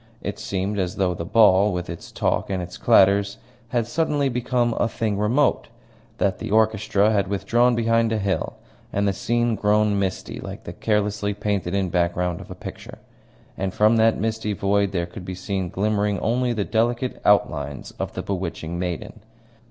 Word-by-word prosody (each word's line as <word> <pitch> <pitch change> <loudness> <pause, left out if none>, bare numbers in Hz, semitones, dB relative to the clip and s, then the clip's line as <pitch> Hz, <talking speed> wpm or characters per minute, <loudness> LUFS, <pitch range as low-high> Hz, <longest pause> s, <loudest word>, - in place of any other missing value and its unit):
It - - -4
seemed 100 +2 -2
as 90 -1 -1
though 95 -2 +1
the 85 - -5
ball, 105 -2 +5
with 90 -1 -3
its 85 - -8
talk - - -1
and 95 -1 -1
its 90 0 -6
clatter, 100 -3 +5 0.5
had 120 -1 0
suddenly 145 +2 0
become 120 -1 0
a - - +3
thing 110 -2 -2
remote 115 +8 +1 0.5
that 95 -2 0
the - - -5
orchestra 110 -1 +2
had 100 -3 +1
withdrawn 120 +5 +2
behind 115 0 +2
a 110 - +1
hill, 100 -2 -1 0.4
and 100 +1 0
the 100 - +1
scene 120 +3 0
grown 105 -1 +2
misty, 95 -1 -3
like - - -8
the - - -7
carelessly 105 -1 0
painted 100 -3 -1
in 95 -2 0
background 90 0 0
of - - -12
a - - -7
picture. - - -9 0.6
And 95 -1 -3
from 110 +2 +4
that 110 0 +3
misty 110 0 -1
void 100 0 +1
there 85 -3 -1
could 90 +2 -10
be 95 0 -6
seen 95 0 -3
glimmering 105 +1 0
only 120 +3 0
the 105 -4 -1
delicate 120 +3 0
outlines 75 -8 +1
of - - -3
the - - -4
bewitching 85 -3 -4
maiden. 90 +5 -4
105 Hz, 175 wpm, -23 LUFS, 95-110 Hz, 0.6 s, ball